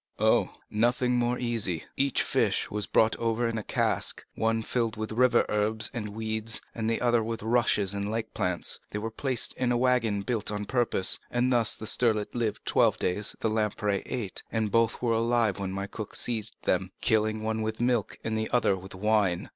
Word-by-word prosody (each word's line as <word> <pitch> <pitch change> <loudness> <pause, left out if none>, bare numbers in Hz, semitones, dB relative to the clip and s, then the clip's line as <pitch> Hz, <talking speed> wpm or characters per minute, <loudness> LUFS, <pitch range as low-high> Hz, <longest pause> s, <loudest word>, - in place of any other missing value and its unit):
"Oh, - - +3 0.2
nothing 125 +3 +2
more 120 0 +1
easy. 115 -9 -1
Each 140 -1 +1
fish - - 0
was 105 -1 -2
brought 110 0 +3
over 115 +1 0
in 115 -1 -2
a - - -6
cask—one 115 +2 -1
filled 115 -1 -1
with 110 0 -4
river 120 +1 +3
herbs 105 +1 +1
and 110 -4 -3
weeds, 110 0 -2 0.2
the 115 0 -1
other 120 -2 +2
with 115 -1 -4
rushes 110 -4 +2
and 100 0 -2
lake 110 0 -3
plants; 90 -1 -1
they - - -4
were 110 +2 -4
placed 130 +1 -1
in 125 -1 0
a 120 - +2
wagon 120 -5 +2
built 115 -1 -2
on 105 0 -3
purpose, 120 -5 +1
and 125 +1 +1
thus 115 -3 +3
the 110 - -8
sterlet 110 -2 +1
lived 110 -3 -2
twelve - - +3
days, 100 +3 -1
the 110 - +1
lamprey 105 -2 0
eight, 110 -7 -3
and 110 -2 0
both 115 +1 +2
were 115 -2 +2
alive 115 -3 +1
when 95 -1 -3
my 100 +1 -3
cook 105 +1 -7
seized 110 -3 0
them, 95 0 0
killing 110 -1 +1
one 110 0 -1
with 110 0 -3
milk 120 -4 0
and 110 0 -2
the 110 0 -1
other 120 -5 +2
with 95 0 -9
wine. 105 -3 +1
110 Hz, 190 wpm, -28 LUFS, 105-120 Hz, 0.2 s, Oh